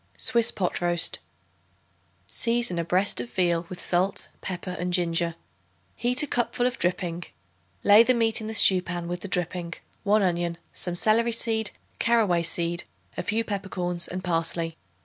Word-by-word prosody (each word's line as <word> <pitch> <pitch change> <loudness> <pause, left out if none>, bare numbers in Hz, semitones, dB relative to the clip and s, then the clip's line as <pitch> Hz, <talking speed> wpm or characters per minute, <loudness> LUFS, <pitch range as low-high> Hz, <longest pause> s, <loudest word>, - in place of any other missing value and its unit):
Swiss 235 -3 +2
Pot 180 -3 -2
Roast. 175 -1 +2 1.1
Season 235 -6 0
a - - 0
breast 180 -3 +1
of 120 - -7
veal 170 +1 0
with 180 - -7
salt, 185 +3 0
pepper 180 -1 -5
and 180 +1 -2
ginger. 170 -1 +1 0.6
Heat 250 +4 +3
a - - +1
cupful 245 -2 0
of 250 -1 -1
dripping; 175 -1 -1 0.6
lay 205 +2 +8
the 255 +2 +3
meat 225 -1 +1
in 215 - -5
the 220 - -4
stew 190 -3 +7
pan 175 -1 -5
with 175 0 -4
the 200 - -6
dripping, 175 -1 -2 0.3
1 210 0 +3
onion, 175 -2 0 0.2
some 175 -1 -1
celery 225 +5 +2
seed, 225 -2 0 0.3
carroway 215 -7 +3
seed, 170 +1 -1 0.3
a - - -2
few 220 +2 0
peppercorns 185 -4 -3
and 185 +1 -5
parsley. 165 -1 -1
180 Hz, 160 wpm, -26 LUFS, 175-220 Hz, 1.1 s, lay